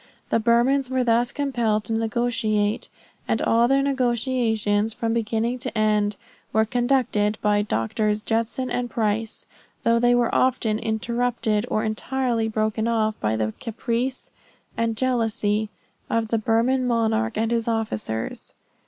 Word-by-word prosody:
The - - +3
Burmans 245 +4 +2
were 260 -1 +1
thus 240 0 +2
compelled 235 -7 0
to 225 - -3
negotiate, 225 -2 0 0.4
and - - +1
all 235 +1 +3
their 275 +1 +3
negotiations 235 -5 0
from 225 -1 -1
beginning 230 +2 -1
to 255 -2 -5
end, 210 -1 +2 0.4
"were 220 0 +3
conducted 240 -3 +1
by 210 0 +3
Drs. 210 - -1
Judson 230 +3 -1
and 245 0 -1
Price, 220 0 -2 0.4
though 230 0 +3
they 245 +1 +4
were 240 -1 +1
often 235 -4 +2
interrupted 230 0 -1
or 215 - 0
entirely 230 +1 -1
broken 220 0 -1
off 220 -2 +1
by 110 0 0
the 110 0 -1
caprice 235 +3 -3 0.4
and 230 -1 -1
jealousy 220 -4 0 0.4
of 230 -1 0
the 230 - +1
Burman 235 +4 +1
monarch 225 -1 +1
and 225 +1 0
his 230 -1 0
officers." 115 - -3
225 Hz, 135 wpm, -24 LUFS, 215-245 Hz, 0.4 s, they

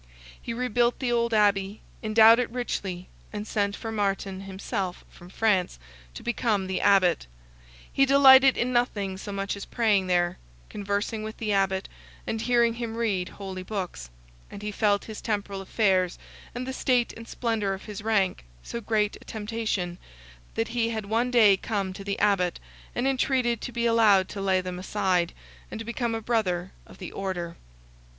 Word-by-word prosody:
He - - -5
rebuilt 240 0 +1
the 255 -3 -1
old 235 0 +1
Abbey, 205 -1 +2 0.2
endowed 220 +1 +6
it 250 - 0
richly, 195 -7 -4 0.2
and 210 -1 -5
sent 200 -1 -1
for 225 - -6
Martin 195 -2 -1
himself 190 -1 -4
from 175 - -14
France, 190 - +1 0.4
to - - -8
become 225 -5 0
the 185 0 -2
Abbot; 190 - +3 0.7
he 275 - +4
delighted 270 -1 +7
in 250 +1 0
nothing 205 -6 0
so 200 +2 -7
much 200 0 -2
as 200 - -7
praying 210 -5 +1
there, 175 -1 +1 0.3
conversing 205 +2 -2
with 220 0 -6
the 215 -2 -1
Abbot, 190 -1 +1 0.4
and 225 - -2
hearing 235 0 +3
him 230 -1 -5
read 200 -6 0
holy 190 -2 -7
books; 185 - -5 0.4
and 200 - -9
he 210 - -3
felt 205 -1 +1
his 220 -1 -8
temporal 200 -3 -2
affairs, 190 -3 +1 0.4
and 250 +1 -3
the 260 - -4
state 250 -2 +1
and 230 0 -10
splendour 225 -6 -1
of 190 - -12
his 210 -2 -7
rank, 205 -4 +1 0.2
so 235 - -5
great 215 -1 0
a - - -16
temptation, 210 -5 -3 0.6
that 225 0 -1
he 230 -1 0
had 220 -2 -3
one 230 +4 +1
day 220 -5 +6
come 195 -1 -3
to 195 +1 -8
the 200 0 -2
Abbot, 195 -4 +1 0.4
and 245 +2 0
entreated 255 -3 +1
to - - -5
be 235 0 -1
allowed 215 -5 +5
to 200 - -5
lay 190 -1 +2
them 180 0 -5
aside, 185 -3 0 0.4
and 225 - -6
become 235 0 -2
a 225 - -3
brother 190 -6 0 0.2
of - - -14
the 180 - -7
order. 180 -3 -4
210 Hz, 170 wpm, -26 LUFS, 195-230 Hz, 0.7 s, delighted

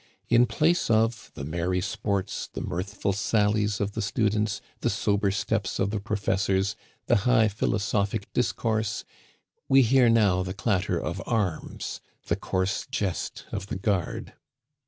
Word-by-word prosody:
In 120 +1 +5
place 170 -1 +2
of 115 0 +2
the - - -6
merry 85 +5 -1
sports, 100 0 -2
the - - -5
mirthful 100 +2 -2
sallies 105 -1 +1
of 100 0 -1
the - - -3
students, 105 -1 0 0.2
the - - 0
sober 100 -1 +1
steps 100 0 -1
of 100 +1 0
the 105 - -1
professors, 100 -1 0 0.3
the - - +4
high 110 +1 +4
philosophic 105 -1 -1
discourse, 110 -3 0 0.7
we 135 0 +7
hear 125 0 +5
now 105 -5 +4
the 95 +1 -4
clatter 95 -3 0
of - - -3
arms, 100 -9 -2 0.2
the - - +1
coarse 95 +1 -1
jest 95 -4 -3
of 100 -1 -4
the - - -3
guard. 95 -2 -1
105 Hz, 140 wpm, -27 LUFS, 95-110 Hz, 0.7 s, we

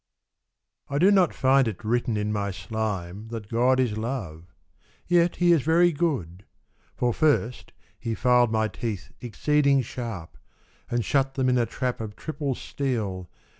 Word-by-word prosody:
I 140 - -2
DO 185 +7 +5
not 190 -5 +4
find 135 -1 +3
it 110 0 -5
written 120 0 0
in 105 0 -1
my 100 -1 -1
slime 100 0 -4
That 110 -2 -7
God 125 +3 +3
is 110 -5 0
Love; 95 -9 -5 0.5
yet 175 0 +3
He 175 0 +3
is 165 -4 +4
very 170 +4 +4
good; 130 - -2 0.5
For 120 -1 0
first, 135 -5 0 0.3
He 115 -1 -3
filed 125 +1 +3
my 110 -1 +1
teeth 105 -2 -5
exceeding 140 +3 +2
sharp, 115 -8 -7 0.5
And 120 -2 -1
shut 135 +1 +1
them 130 -1 +1
in 125 - +3
a 120 - +1
trap 125 -2 -3
of 105 -2 -6
triple 145 -2 -3
steel. 105 - -3
120 Hz, 155 wpm, -25 LUFS, 105-140 Hz, 0.5 s, DO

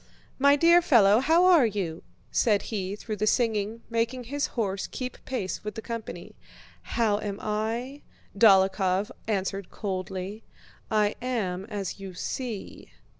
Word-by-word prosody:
"My 280 +1 +6
dear 340 +4 +6
fellow, 220 - +5
how 325 +7 +4
are 340 -9 +6
you?" 190 -6 -3 0.3
said 210 -4 +2
he 195 -1 -2
through 215 0 -6
the 215 +2 0
singing, 220 -1 0
making 235 +2 -1
his 280 +4 -2
horse 200 -4 -1
keep 255 -1 -6
pace 200 -10 -3
with 210 -1 -5
the 225 - -5
company. 230 -2 -6 0.6
"How 215 -3 +2
am 205 -2 -4
I?" 230 +6 -3 0.3
Dólokhov 195 -2 +4 0.2
answered 195 -2 -2
coldly. 190 +1 -5 0.5
"I 210 -1 +2
am 200 -7 -2
as 205 -3 -5
you 190 -2 -8
see." 235 0 -5
215 Hz, 135 wpm, -27 LUFS, 195-240 Hz, 0.6 s, My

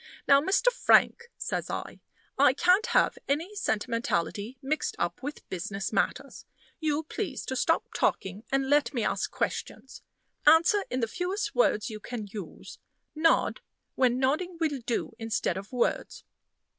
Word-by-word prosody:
"Now, 280 0 +6
Mr. 390 +9 +3
Frank," 475 -1 +3
says - - -3
I, - - -5 0.4
"I - - +5
can't 365 +4 +3
have - - +2
any 320 +8 -1
sentimentality 225 - -2
mixed 295 +4 -2
up - - -2
with 285 +3 -7
business 195 +2 -4
matters. - - -1 0.4
You 310 -1 0
please 305 - -4
to 260 - -3
stop 325 +6 +1
talking, 190 +3 -1
and 270 0 +1
let 290 0 +2
me 235 - 0
ask - - -1
questions. 265 - -4 0.5
Answer 340 +6 +6
in 255 - -2
the 230 - +1
fewest 390 - -3
words 220 - +2
you 215 - -6
can 230 0 -6
use. 200 -3 -9 0.3
Nod 325 +9 +2 0.3
when 250 -2 +2
nodding 310 +7 0
will 305 -4 0
do 235 0 -2
instead 225 -5 -1
of 195 +2 -7
words." 245 -2 -1
270 Hz, 145 wpm, -28 LUFS, 225-330 Hz, 0.5 s, Now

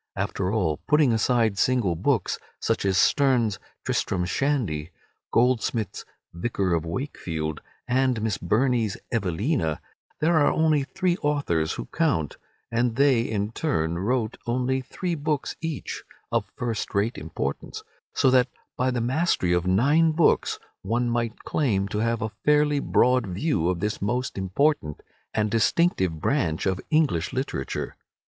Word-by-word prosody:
After 95 -1 -1
all, 90 -9 +1
putting 150 -5 +4
aside 110 -2 +2
single 125 -8 +2
books, 105 - 0 0.2
such - - -1
as 95 -1 +2
Sterne's 120 -4 +3 0.3
"Tristram 90 -2 0
Shandy," 90 - -1 0.4
Goldsmith's 115 -3 +1 0.3
"Vicar 95 0 -1
of 85 0 -1
Wakefield," 80 - -4 0.3
and 130 -1 +2
Miss 110 -3 -1
Burney's 115 +3 +1
"Evelina," 100 - 0 0.4
there 160 +2 +3
are 145 - +4
only 155 -2 +3
three 175 +6 -1
authors 140 - 0
who - - -5
count, 145 - 0 0.3
and 120 0 +1
they 135 -3 +4
in 105 -2 -2
turn 85 - -1
wrote 110 +2 -1
only 130 +2 0
three 175 +7 -4
books 150 -2 -2
each, 160 -3 -4 0.3
of - - -1
first 115 -5 -3
rate 105 +4 0
importance, 435 - -4 0.3
so 130 - +4
that 125 -1 +5 0.3
by 130 +1 +1
the 125 -2 -1
mastery 125 - +1
of 90 +1 +1
nine 145 - +4
books 160 +1 +2 0.2
one 120 +4 0
might 115 -1 -2
claim 100 -10 0
to 105 - -2
have 115 0 0
a 110 - -3
fairly 150 -1 +3
broad 125 -4 +3
view 90 - 0
of 90 -2 -1
this 105 +1 -2
most 125 +5 -1
important 95 - 0 0.3
and 105 -1 0
distinctive 110 - +2
branch 85 - 0
of 95 -1 0
English 150 - +2
literature. 130 - -3
115 Hz, 140 wpm, -25 LUFS, 95-140 Hz, 0.4 s, that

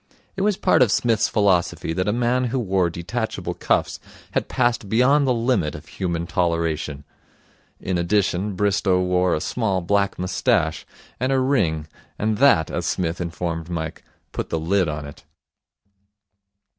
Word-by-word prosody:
It 190 - -3
was 205 -1 +2
part - - +3
of 120 -5 +5
Psmith's 115 -1 +2
philosophy 95 -5 +1
that 90 +3 -1
a - - +3
man 120 +2 +1
who 125 +2 -1
wore 95 -6 +1
detachable 95 +8 -4
cuffs - - 0 0.3
had - - -1
passed 120 -5 0
beyond 135 +6 +4
the - - +3
limit 115 -9 0
of 75 - -10
human 85 -1 -3
toleration. 85 -4 -1 0.8
In 90 -2 -2
addition, 100 +2 0
Bristow 100 -1 +2
wore 90 0 +2
a - - -1
small 100 0 -1
black 100 +3 0
moustache 90 -2 0 0.3
and 130 +2 0
a 135 - +3
ring 100 - +1 0.3
and 110 0 -1
that, 135 - +4
as - - -2
Psmith 85 -1 -1
informed 85 -1 -4
Mike, 80 -2 -4 0.3
put - - -4
the 80 - -1
lid 90 +3 +1
on 75 -1 -4
it. 70 - -11
95 Hz, 155 wpm, -22 LUFS, 85-115 Hz, 0.8 s, of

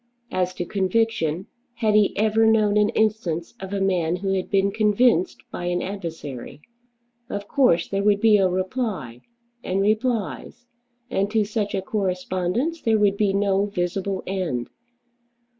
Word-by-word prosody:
As 185 0 -1
to 175 - -3
conviction, 190 -4 0 0.3
had 220 -3 +1
he 210 -1 +3
ever 220 +1 +3
known 215 -2 +3
an 210 0 +4
instance 210 -8 -1
of 190 0 -7
a 200 - -1
man 180 -3 +1
who 195 +1 -2
had 185 -1 -2
been 195 0 +2
convinced 210 -2 +2
by 175 - -5
an 175 0 -1
adversary? 165 -10 -6 0.7
Of 205 0 -5
course 255 - +3
there 195 0 -1
would 205 0 +3
be 215 -1 +5
a 190 -2 +3
reply, 185 - -3 0.4
and 185 +1 -1
replies. 220 +2 -1 0.5
And 200 -4 0
to 215 -1 +1
such 210 -1 -2
a 190 - -2
correspondence 190 - -1
there 225 -1 +2
would 205 -2 +3
be 200 -1 +2
no 200 0 +1
visible 190 0 -2
end. 175 -11 -3
200 Hz, 150 wpm, -23 LUFS, 185-215 Hz, 0.7 s, be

